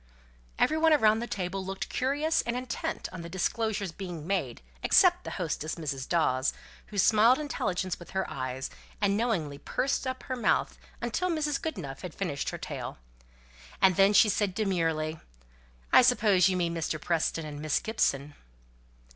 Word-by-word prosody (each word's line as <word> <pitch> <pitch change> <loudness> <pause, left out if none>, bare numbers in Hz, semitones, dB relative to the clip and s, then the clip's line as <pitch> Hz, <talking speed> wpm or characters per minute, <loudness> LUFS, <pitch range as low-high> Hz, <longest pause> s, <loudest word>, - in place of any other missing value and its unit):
Every 315 - +2
one 320 0 +5
around 220 -6 +4
the 235 - -4
table 190 -1 -3
looked 190 +1 -4
curious 295 +5 +1
and 235 - -3
intent 250 -1 -3
on 180 -2 -7
the 170 - -8
disclosures 200 +1 -1
being 175 -4 -7
made, 195 +2 -2 0.2
except 360 -2 +5
the - - -4
hostess, 160 -3 -2
Mrs. 140 -5 -4
Dawes, 145 -5 +2 0.3
who 210 - -8
smiled 220 +5 +5
intelligence 185 - -2
with 175 - -12
her 190 0 -2
eyes, 130 -1 -4 0.3
and 200 -1 +2
knowingly 180 -11 -1
pursed 270 - -1
up 260 0 -4
her 255 - -3
mouth 235 -4 +1 0.2
until 365 0 -1
Mrs. 300 -4 -1
Goodenough 170 - -5
had 180 -4 -7
finished 160 -8 -2
her - - -5
tale. - - -6 0.8
Then 195 +2 +5
she 210 - +7
said 205 -2 0
demurely, 165 -6 0 0.7
"I - - +9
suppose 210 -7 +4
you 185 - 0
mean 170 -1 0
Mr. 160 -2 -2
Preston 165 -1 -1
and 145 -1 -7
Miss 155 -1 +1
Gibson?" 150 - -1
190 Hz, 160 wpm, -29 LUFS, 165-235 Hz, 0.8 s, I